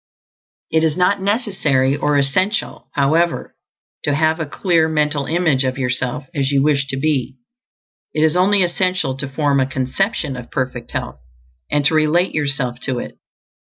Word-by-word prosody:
It 160 0 +2
is 160 0 +1
not 190 +2 +2
necessary 190 - +1
or 145 0 +1
essential, 145 - 0
however, 160 +4 +1 0.5
to 145 - +1
have 160 +2 +2
a 160 - -2
clear 165 +1 +2
mental 150 -2 0
image 160 -5 +2
of 130 0 -1
yourself 125 +1 -2
as 140 -4 0
you 135 -1 +3
wish 140 -2 +2
to 135 0 -3
be; 135 -3 0 0.8
it 155 - 0
is 160 0 +3
only 190 +2 +4
essential 180 -5 0
to 140 +1 -4
form 140 0 +1
a 130 - +2
CONCEPTION 135 - -1
of 125 -1 -8
perfect 130 -1 -3
health, 65 +2 -5 0.5
and 145 -1 +1
to 150 - +4
relate 155 +4 +2
yourself 135 -5 -1
to 130 0 -3
it. - - -7
150 Hz, 160 wpm, -19 LUFS, 135-170 Hz, 0.8 s, only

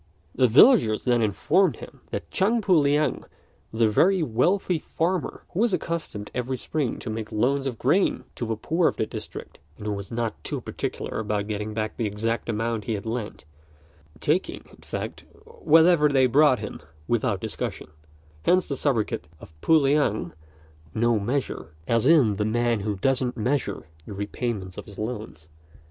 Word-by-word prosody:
The 130 - +4
villagers 115 - +6
then 120 -2 +2
informed 115 - +2
him - - -12
that - - -5
Chang 215 +5 +2
Pu 195 -3 +2
liang 150 0 +2 0.5
was 110 +1 0
a - - +6
very 180 - +3
wealthy 170 - +1
farmer, 170 +2 -2
who 180 - -4
was 230 -2 +2
accustomed 160 - -5
every 125 +1 -2
spring 140 -2 -2
to - - -7
make 110 0 -5
loans 135 +5 +1
of 125 -4 -4
grain 175 - +2
to 120 - -4
the 115 - -1
poor 165 +10 +1
of - - -1
the - - 0
district, - - -8 0.2
and 105 - -9
who 105 - -1
was 100 -1 -6
not 115 -1 -3
too - - -3
particular - - -4
about 105 -2 -1
getting 105 0 -4
back 110 -1 -3
the 115 - 0
exact 115 +3 -2
amount 115 0 -2
he 115 - -1
had 100 - -6
lent, 110 -7 -5 0.7
taking, 165 +6 -1
in - - -17
fact, - - -6 0.2
whatever 175 - +4
they 135 -2 +4
brought 135 +1 +5
him - - -7 0.3
without 110 -4 0
discussion; 110 -5 -5 0.5
hence 180 - +3
the 140 - -2
sobriquet 125 -6 0 0.2
of 80 - -14
pu 160 - +5
liang 140 -6 +1 0.6
"no 115 0 +2
measure" 110 - -3
(i.e., 120 0 +4
the 105 - -1
man 120 +1 +1
who 105 +1 -2
doesn't 125 +4 0
measure 125 +5 -1 0.2
the 105 - -6
repayments 100 -1 -4
of - - -9
his 100 - -13
loans). 105 -8 -6
120 Hz, 170 wpm, -25 LUFS, 110-150 Hz, 0.7 s, villagers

